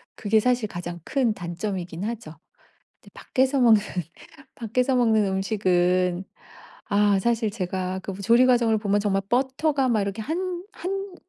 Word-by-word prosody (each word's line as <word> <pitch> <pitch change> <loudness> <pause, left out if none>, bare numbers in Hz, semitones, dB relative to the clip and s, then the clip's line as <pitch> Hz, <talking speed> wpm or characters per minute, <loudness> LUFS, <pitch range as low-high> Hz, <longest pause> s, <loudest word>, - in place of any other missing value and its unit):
그게 220 +1 +2
사실 245 -3 +1
가장 175 0 -6
큰 255 -6 +1
단점이긴 175 -1 -5
하죠. 230 -6 -5 0.7
근데 - - -18
밖에서 265 +1 0
먹는 225 -4 +6 0.8
밖에서 250 +3 0
먹는 220 -3 +3
음식은 185 -2 +1 0.6
아 205 -1 +3
사실 230 0 0
제가 185 -2 -3
그 195 +1 -7
조리 235 +5 +5
과정을 235 -3 +3
보면 205 -1 +1
정말 195 -1 0
버터가 265 +2 +1
막 220 -4 +2
이렇게 200 +2 -4
1- 350 +5 -3
1 390 +1 -5
215 Hz, 265 characters per minute, -24 LUFS, 190-250 Hz, 0.8 s, 먹는